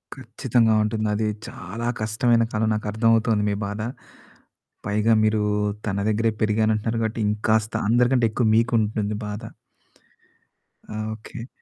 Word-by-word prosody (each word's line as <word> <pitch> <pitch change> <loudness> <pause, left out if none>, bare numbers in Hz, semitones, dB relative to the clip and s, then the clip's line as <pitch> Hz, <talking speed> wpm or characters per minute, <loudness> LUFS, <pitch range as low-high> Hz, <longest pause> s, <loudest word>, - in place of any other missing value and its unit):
ఖచ్చితంగా 115 -2 +1
ఉంటుంది. 110 0 -1
అది 110 0 0 0.2
చాలా 115 +7 -6
కష్టమైన 115 +2 +2
కాలం 110 +1 +1
నాకు 105 - -4
అర్థమవుతుంది 115 -1 +2
మీ 100 - 0
బాధ. 105 +1 -4 1.1
పైగా 105 +2 +2
మీరు 110 -1 +2 0.4
తన 100 -1 -1
దగ్గరే 110 +1 +1
పెరిగాను 110 0 +2
అంటున్నారు 115 +2 -2
కాబట్టి 110 +1 -2
ఇంకాస్త 110 +1 0 0.2
అందరికంటే 120 +1 +3
ఎక్కువ 115 +1 +1
మీకు 115 +2 +2
ఉంటుంది 105 -1 -1
బాధ. 105 +1 -6 1.5
ఆ! - - -6 0.2
ఓకె. 115 +2 -9
110 Hz, 130 wpm, -23 LUFS, 105-115 Hz, 1.5 s, అందరికంటే